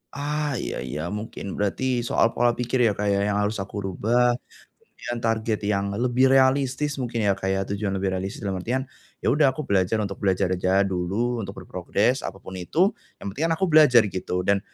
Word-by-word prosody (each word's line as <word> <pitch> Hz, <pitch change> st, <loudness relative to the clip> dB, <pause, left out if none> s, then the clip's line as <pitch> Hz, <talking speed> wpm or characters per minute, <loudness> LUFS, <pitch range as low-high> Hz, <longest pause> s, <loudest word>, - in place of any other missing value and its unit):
Ah, 150 Hz, +1 st, -2 dB
iya -, -, -4 dB
iya, 75 Hz, +5 st, -4 dB
mungkin 105 Hz, -1 st, -5 dB
berarti 120 Hz, +5 st, 0 dB
soal 115 Hz, 0 st, +1 dB
pola 120 Hz, 0 st, +3 dB
pikir 125 Hz, +1 st, 0 dB
ya, 115 Hz, -, +4 dB
Kak, 105 Hz, 0 st, -2 dB
ya 100 Hz, -1 st, +2 dB
yang 100 Hz, -, 0 dB
harus 105 Hz, +2 st, 0 dB
aku 100 Hz, +1 st, -7 dB
rubah, 120 Hz, +6 st, +2 dB, 0.4 s
kemudian 120 Hz, -, -8 dB
target 110 Hz, -1 st, 0 dB
yang 100 Hz, -1 st, 0 dB
lebih 125 Hz, +3 st, +3 dB
realistis 135 Hz, +2 st, +2 dB
mungkin 120 Hz, -3 st, -2 dB
ya, 100 Hz, -, +3 dB
Kak, 95 Hz, -, -3 dB
ya 95 Hz, 0 st, +1 dB
tujuan 100 Hz, 0 st, -3 dB
lebih 95 Hz, 0 st, -1 dB
realistis 95 Hz, +2 st, -4 dB
dalam 95 Hz, -2 st, -2 dB
artian, 125 Hz, +8 st, -1 dB, 0.4 s
ya -, -, 0 dB
udah 135 Hz, -1 st, +3 dB
aku 155 Hz, -, -4 dB
belajar 100 Hz, -1 st, +1 dB
untuk 100 Hz, -1 st, -5 dB
belajar 95 Hz, -1 st, +1 dB
aja 95 Hz, +2 st, +2 dB
dulu, 100 Hz, +6 st, -1 dB
untuk 95 Hz, -2 st, -6 dB
berprogres 100 Hz, +9 st, 0 dB
apapun 95 Hz, -1 st, -8 dB
itu, 170 Hz, -, +2 dB, 0.3 s
yang 100 Hz, -, -4 dB
penting 140 Hz, +11 st, -3 dB
kan 165 Hz, -, +2 dB
aku 190 Hz, -, +1 dB
belajar 145 Hz, -7 st, +7 dB
gitu 95 Hz, -2 st, -3 dB
dan, 100 Hz, +1 st, +2 dB
110 Hz, 195 wpm, -24 LUFS, 95-125 Hz, 0.4 s, belajar